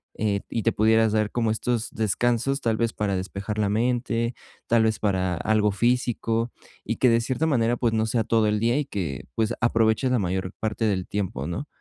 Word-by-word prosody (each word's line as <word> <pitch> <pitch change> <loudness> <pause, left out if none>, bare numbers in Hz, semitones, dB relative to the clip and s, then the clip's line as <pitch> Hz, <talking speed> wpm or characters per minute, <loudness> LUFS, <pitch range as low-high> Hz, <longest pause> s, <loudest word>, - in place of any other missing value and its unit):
eh, 100 -2 0
y 115 - -2
te 115 - +3
pudieras 110 +1 +3
dar 110 -1 +1
como 115 -2 0
estos 115 +1 -1
descansos, 120 +5 0
tal 115 -2 0
vez 115 0 0
para 100 -2 -1
despejar 100 +3 -4
la 105 -2 +1
mente, 115 +1 0 0.3
tal 115 -1 +4
vez 110 0 +1
para 95 -3 0
algo 105 +3 +1
físico. 120 +1 0 0.4
Y - - -1
que 125 - +3
de 115 0 +3
cierta 130 +6 -1
manera, 120 -6 +2
pues, 115 -2 0
no 110 0 +1
sea 110 +1 0
todo 110 -1 +2
el 105 0 +1
día, 120 +4 +2
y 150 - -1
que, 80 - -4
pues, 110 +1 0
aproveches 115 +2 +2
la 125 - +2
mayor 95 0 -2
parte 110 +1 -1
del 95 -4 0
tiempo, 95 -10 -3
¿no? 110 - -4
110 Hz, 205 wpm, -25 LUFS, 105-120 Hz, 0.4 s, tal